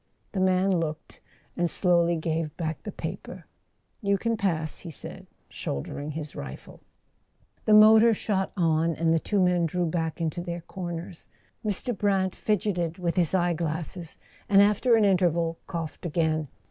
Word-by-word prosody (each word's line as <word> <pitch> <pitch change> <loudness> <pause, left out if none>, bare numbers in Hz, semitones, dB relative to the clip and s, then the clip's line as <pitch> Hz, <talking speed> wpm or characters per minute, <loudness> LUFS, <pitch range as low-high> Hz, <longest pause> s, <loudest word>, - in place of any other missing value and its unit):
The 195 - -3
man 185 0 +3
looked, 155 -2 -5 0.3
and 175 -1 +1
slowly 170 -2 +3
gave 160 -1 -2
back 160 -2 -3
the - - -6
paper. - - -7 0.6
"You 200 -2 +2
can 230 +3 -1
pass," 165 -7 -2
he 170 - -9
said, 155 - -9 0.2
shouldering 145 - -5
his 150 -1 -6
rifle. 65 -1 -9 0.8
The 215 - +6
motor 220 +1 +7
shot 195 -2 -1
on, 165 -1 +2
and 165 0 +2
the 165 - +3
two 205 +5 -1
men 180 -2 +3
drew 180 +2 -1
back 160 0 -2
into 165 +1 -2
their 175 -1 -5
corners. 175 -1 -7 0.3
Mr. 215 +3 -2
Brant 195 -2 +1
fidgeted 180 -5 -1
with 175 -2 -1
his 175 -3 +2
eye¬ 175 -2 +2
glasses, 165 +1 -4 0.3
and 195 -1 +6
after 210 +4 +4
an 220 -2 +4
interval 170 -4 +2
coughed 165 -4 -5
again. 155 -2 0
175 Hz, 155 wpm, -27 LUFS, 160-195 Hz, 0.8 s, motor